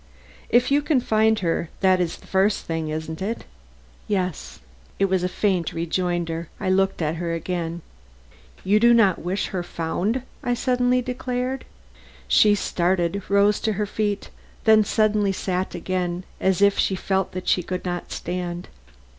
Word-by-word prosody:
"If 245 +3 +3
you 285 +1 +4
can 295 -2 +2
find 220 -1 +2
her 170 -2 -1
that 185 -2 +4
is 170 -2 -2
the - - -18
first 195 +2 +1
thing, 165 -1 -2
isn't 160 +1 -5
it?" 220 +5 -3 0.6
"Yes." 185 -5 -2 0.4
It 195 - +3
was 190 -1 +1
a 180 - 0
faint 185 -3 0
rejoinder. 170 -1 -2
I 190 -3 0
looked 195 -2 +1
at 155 +2 -1
her 170 0 -2
again. 170 -1 -3 0.8
"You 205 +3 +3
do 235 +1 +6
not 200 -6 +4
wish 185 +4 -2
her 185 - -2
found," 175 +8 -2 0.2
I 245 - 0
suddenly 250 0 +1
declared. 250 +1 -3 0.6
She 210 -1 +5
started, 180 0 0
rose 200 +1 +4
to 220 - 0
her 210 +1 -1
feet, 205 0 -2 0.3
then 220 -1 +6
suddenly 210 -1 +2
sat 185 0 -2
again 180 0 -2 0.2
as 190 0 +2
if 200 0 +4
she 190 - +2
felt 190 0 -1
that 185 0 -6
she 180 - +3
could 180 +1 -5
not 175 -1 -4
stand. 175 0 -4
190 Hz, 160 wpm, -23 LUFS, 175-215 Hz, 0.8 s, do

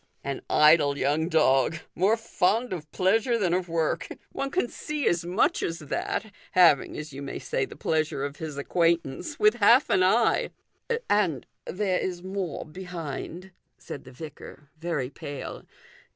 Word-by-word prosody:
" - - -41
An 135 - -5
idle 150 -2 +5
young 150 +4 +1
dog; 150 -2 +3 0.2
more 200 +6 +3
fond 225 +1 0
of 155 -4 -7
pleasure 225 +6 +2
than 185 -6 +1
of 180 -1 -1
work. 165 -1 0 0.2
One 275 - -3
can 355 -2 0
see 300 +3 -3
as 170 0 +2
much 175 +2 +1
as 165 - -2
that, 200 +7 -3 0.2
having, 170 -6 +5
as 150 -1 -7
you 140 - -7
may 140 - -5
say, 135 - -1
the - - -12
pleasure 155 -3 -1
of 145 0 -6
his 155 -3 -6
acquaintance, 170 - 0
with 215 +3 +4
half 235 +5 +5
an 185 - +4
eye." 220 +5 +3 0.3
" - - -52 0.3
And 180 - +2 0.2
there 190 -1 0
is 180 -1 -3
more 190 -4 -4
behind," 180 +1 -7 0.3
said 140 - -8
the 130 - -13
vicar, 145 0 -11
very 165 -6 -2
pale. 145 -2 -7
170 Hz, 165 wpm, -27 LUFS, 150-195 Hz, 0.3 s, idle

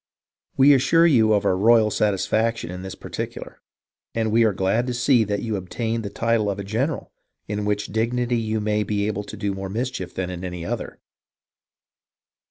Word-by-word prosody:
We 140 +2 +7
assure 150 +5 +4
you 115 -9 +4
of 105 - +1
our 95 - +3
royal 110 +2 +4
satisfaction 110 0 0
in 90 0 -6
this 95 0 -7
par - - -11
ticular, - - -6 0.6
and 110 -1 0
we 115 +1 +4
are 110 - +4
glad 100 +6 0
to 125 - -2
see 120 -1 +3
that 100 0 -2
you 110 -2 -2
obtained 110 +5 -3
the 100 - -4
title 115 0 0
of 100 - -2
a 100 - -5
general, 120 +10 -2 0.4
in 105 0 -3
which 105 -1 -1
dignity 120 +2 0
you 110 -1 -1
may 105 0 0
be 105 -1 -1
able 105 -1 -2
to 105 - -9
do 100 -1 -2
more 95 0 -5
mischief 110 -4 -4
than 90 -1 -3
in 90 0 -7
any 90 -2 -5
other. - - -4
110 Hz, 190 wpm, -23 LUFS, 100-115 Hz, 0.6 s, We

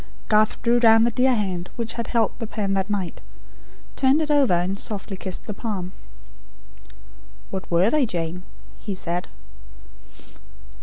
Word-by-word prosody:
Garth 215 0 +3
drew 240 0 +4
down 225 -1 +6
the 235 - +3
dear 255 +2 +3
hand 185 -5 -2
which 230 -1 -3
had 235 - -4
held 230 -3 +1
the 225 - -4
pen 205 -3 -2
that 195 +1 -1
night; 195 -4 -3 0.7
turned 270 +3 +4
it 305 -1 0
over, 280 -9 +4
and 185 +3 -1
softly 200 -1 -5
kissed 185 -1 -5
the 210 - -4
palm. 195 -4 -4 1.6
"What 190 -1 -5
were 175 +6 +3
they, 295 -5 +3
Jane?" 170 -2 -3 0.4
he 200 -3 -4
said. 175 -1 -2
210 Hz, 150 wpm, -23 LUFS, 185-235 Hz, 1.6 s, down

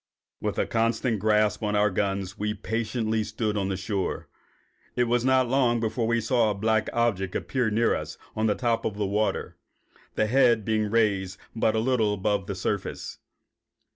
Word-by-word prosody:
With - - -2
a - - +2
constant 115 0 0
grasp 105 0 +2
on 105 -1 -1
our 105 0 +3
guns, 95 0 -1
we 105 +1 -2
patiently 110 0 -1
stood 110 0 -2
on 100 -2 -1
the 95 - -2
shore. 95 0 -3 0.7
It 125 - +3
was 120 0 +1
not 130 -1 +3
long 120 -2 +2
before 115 +1 -1
we 115 0 +2
saw 115 0 +2
a 105 - -1
black 110 +1 +1
object 100 -6 0
appear 125 -4 0
near 115 +2 +2
us - - -4 0.2
on 110 +1 +1
the 105 - +2
top 120 -2 0
of 105 - -3
the 105 - 0
water, 105 +2 -1 0.6
the 110 - +2
head 115 -2 +3
being 110 -1 +1
raised 100 -4 +1 0.2
but 110 -1 +1
little 110 -2 +2
above 100 0 -1
the 100 - -3
surface. 95 +2 -3
110 Hz, 175 wpm, -26 LUFS, 105-115 Hz, 0.7 s, our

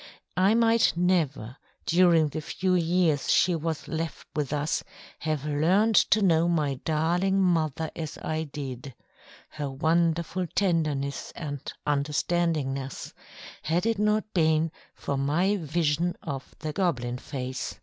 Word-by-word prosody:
I 195 +4 +4
might 230 0 +4
never, 155 -9 0 0.3
during 170 -3 +4
the 155 - -4
few 185 +4 -1
years 165 -5 +2
she 180 - +4
was 160 -1 -3
left 160 -1 -4
with 145 -3 -1
us, 150 +1 -1 0.4
have 155 -3 -2
learnt 180 +9 +2
to 215 -1 +4
know 170 -2 +4
my 150 -6 0
darling 175 +5 +1
mother 160 -4 +1
as 155 -3 -5
I 160 0 -3
did 135 -3 -7 0.5
her 145 -2 -4
wonderful 165 +5 0
tenderness 155 -7 0
and 145 -4 -5
"understandingness" 145 -2 -1 0.5
had 170 +5 0
it 225 -2 +1
not 210 +1 +2
been 160 -2 +2 0.2
for 140 - -3
my 175 +9 +1
vision 165 0 0
of 140 -4 -6
the 155 -1 -5
"Goblin 125 -9 -1
Face." 130 -1 -5
160 Hz, 130 wpm, -27 LUFS, 145-175 Hz, 0.5 s, I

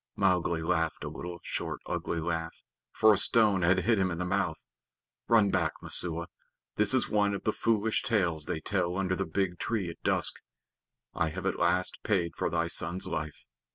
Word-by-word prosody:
Mowgli 90 -4 +1
laughed 80 -1 0
a - - -4
little 90 0 -7
short - - -4
ugly 85 - -3
laugh, 80 0 -3 0.4
for 110 0 +5
a 100 - +1
stone 105 -5 +4
had 90 +2 +3
hit 110 +2 +2
him 95 -1 +2
in 85 - -4
the 90 - -2
mouth. 95 -3 0 0.7
"Run 110 -4 +4
back, 85 -4 +1
Messua. 85 -1 0 0.5
This 105 +3 +4
is 130 - +2
one 105 -1 +1
of - - -6
the 110 - 0
foolish 110 -1 +1
tales 85 -9 +1
they 80 - -3
tell 90 -2 -1
under 95 -1 0
the - - -3
big 90 +1 -1
tree 100 -7 -2
at - - -15
dusk. - - +1 0.7
I 80 - 0
have 95 +3 -6
at 95 - -1
least 85 +1 +1
paid 90 -6 0
for - - -1
thy 85 +1 0
son's 85 +3 0
life. 75 -4 -5
90 Hz, 190 wpm, -29 LUFS, 85-100 Hz, 0.7 s, for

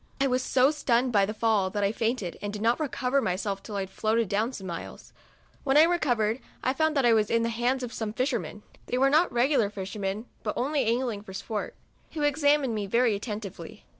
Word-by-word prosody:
I 275 - +3
was 255 -1 +1
so 255 +2 +3
stunned 250 -4 +1
by 200 -2 +4
the 215 - -3
fall 215 -4 +2
that 205 +2 -2
I 200 - +2
fainted, 225 -5 -2
and 205 - -3
did 210 +1 -5
not 235 +2 +2
recover 275 -2 0
myself 195 0 -2
till 210 - -8
I 200 - -1
had 190 0 -6
floated 220 0 0 0.2
some 195 -7 -8
miles. 170 -2 -8 0.5
When 275 0 +3
I 305 - +9
recovered, 250 -10 +1 0.2
I 260 - +1
found 315 +1 +1
that 270 - +3
I 235 - +6
was 215 -2 +2
in 230 0 +2
the 230 - 0
hands 245 +3 0
of 245 - -5
some 220 -2 -3
fishermen, 220 - -2 0.2
(they 250 - -1
were 270 +1 +3
not 320 +4 +4
regular 240 -2 +2
fishermen, 200 +1 -4 0.2
but - - -3
only 275 +1 0
angling 230 -2 0
for 195 -2 -11
sport,) 210 +2 -4 0.4
who 305 - -2
examined 290 -3 +2
me 210 -2 -3
very 235 +2 +3
atten 210 +1 -4
tively. 195 -3 -9
230 Hz, 220 wpm, -27 LUFS, 205-265 Hz, 0.5 s, I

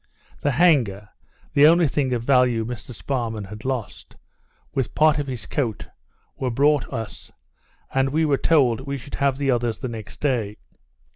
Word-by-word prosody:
The 145 - 0
hanger 120 - +2 0.4
(the 145 +1 +7
only 170 0 +5
thing 135 -1 -1
of 120 -2 -1
value 125 -3 +3
Mr 120 +1 -7
Sparrman 115 -3 -3
had 105 0 -9
lost) 130 -5 -5 0.6
with 135 -4 -2
part 155 -1 +4
of 145 - -3
his 125 -7 -5
coat, 115 - -3 0.5
were 130 - -2
brought 145 +3 +2
us; 115 -5 -6 0.6
and 135 0 +2
we 160 +3 +1
were 140 -3 +1
told, 130 -7 +3
we 140 +1 -4
should 135 +2 -12
have 140 -1 +2
the 140 -1 +1
others 120 -2 0
the - - -5
next 110 -3 -9
day. 115 -8 -1
130 Hz, 165 wpm, -23 LUFS, 115-140 Hz, 0.6 s, the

